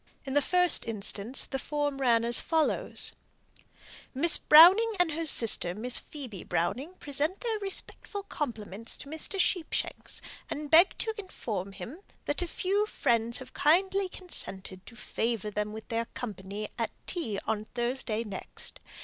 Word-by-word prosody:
From 265 - -5
the 290 - +4
first 360 +1 +3
mentioned 205 -2 0
ladies 255 - +5
the 270 - -4
form 290 -1 -2
ran 235 -3 +3
as 235 0 +6
follows: 320 -1 0 1.0
"Miss 325 +6 +4
Browning 375 +9 +7
and 355 -2 +3
her 325 +2 -3
sister, 210 -9 +4
Miss 240 +4 +2
Phoebe 250 - -8
Browning, 265 - -2
present 295 +6 -1
their 450 -3 -1
respectful 400 0 -4
compliments 230 - -4
to - - -11
Mr. 320 +6 -2
Sheepshanks, 355 -2 -1 0.3
and 295 0 -5
beg 340 +4 +6
to 445 - -2
inform 205 - -5
him 225 - -9 0.3
that 290 - -1
a 355 - -1
few 400 +5 0
friends 235 - +1
have 260 - -11
kindly 375 +6 +2
consented 190 - -6
to 235 - -12
favour 225 -1 -3
them 210 +1 -2
with 220 +1 -9
their 230 0 -1
company 210 -4 -6
at - - 0 0.2
tea 275 - -3
on 215 -1 -2
Thursday 240 -2 -3
next. 205 -4 -8
265 Hz, 150 wpm, -29 LUFS, 220-340 Hz, 1.0 s, Browning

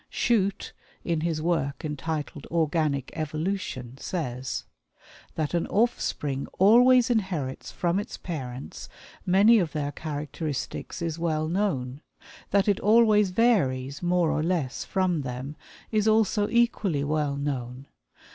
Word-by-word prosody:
Shute, 200 -5 0 0.3
in 165 -3 -1
his 160 -2 -1
work 155 -5 -1
entitled 150 -2 -4
"Organic 155 -4 0
Evolution," 155 -5 -3
says: 130 -7 -3 0.7
"That 155 0 -2
an 170 - 0
offspring 150 - 0
always 245 +5 +6
inherits 180 - -2
from 175 +2 0
its 205 - -6
parents 135 -6 -7 0.4
many 205 +5 +6
of 170 -5 -1
their 145 -2 -2
characteristics 150 +1 -5
is 165 -1 -3
well 155 -2 0
known; 155 -8 -1 0.5
that 200 0 +2
it 200 -2 +2
always 215 -2 +5
varies, 145 - +1
more 175 -2 +2
or - - 0
less, 160 -6 -1
from 185 -5 0
them, 130 +2 -5 0.4
is 215 -1 +2
also 215 -1 +3
equally 215 -10 +1
well 150 -1 0
known. 135 -2 -4
160 Hz, 120 wpm, -26 LUFS, 140-195 Hz, 0.7 s, always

